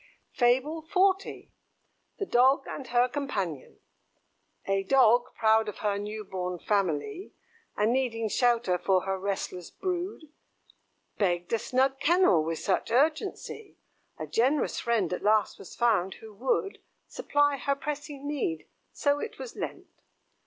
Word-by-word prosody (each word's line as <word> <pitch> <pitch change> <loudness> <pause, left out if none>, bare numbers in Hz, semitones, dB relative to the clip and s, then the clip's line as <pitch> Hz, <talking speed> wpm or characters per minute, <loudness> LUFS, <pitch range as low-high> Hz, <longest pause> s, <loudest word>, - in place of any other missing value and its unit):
FABLE 270 +6 +1
XL. 385 0 +3 0.9
THE 400 - -2
DOG 265 +3 +4
AND 270 - -7
HER 245 +1 +3
COMPANION. 205 - -4 0.9
A 195 0 +1
Dog, 240 +2 +4
proud 220 -1 +3
of 210 - -8
her 200 -1 +1
new 210 +1 -5
born 180 -2 -4
family, 200 - -1 0.4
And 215 +3 +2
needing 235 -4 0
shelter 230 -5 +2
for 185 0 +2
her 190 0 -2
restless 190 -2 -4
brood, 360 -4 -4 0.9
Begged 175 -1 0
a 230 - +2
snug 265 +3 +1
kennel 315 - +4
with 165 +1 -2
such 190 - -1
urgency, 315 - -1 0.4
A - - -5
generous 265 +6 +1
friend 220 -7 0
at - - -3
last 215 -1 +2
was - - -11
found 215 -6 +1
who 220 -1 -13
would 260 - -1 0.3
Supply 290 - +1
her 280 +1 0
pressing 290 -1 -6
need 250 - -2 0.2
so 285 0 +1
it 445 - -6
was - - -8
lent. - - -5
240 Hz, 135 wpm, -28 LUFS, 200-290 Hz, 0.9 s, DOG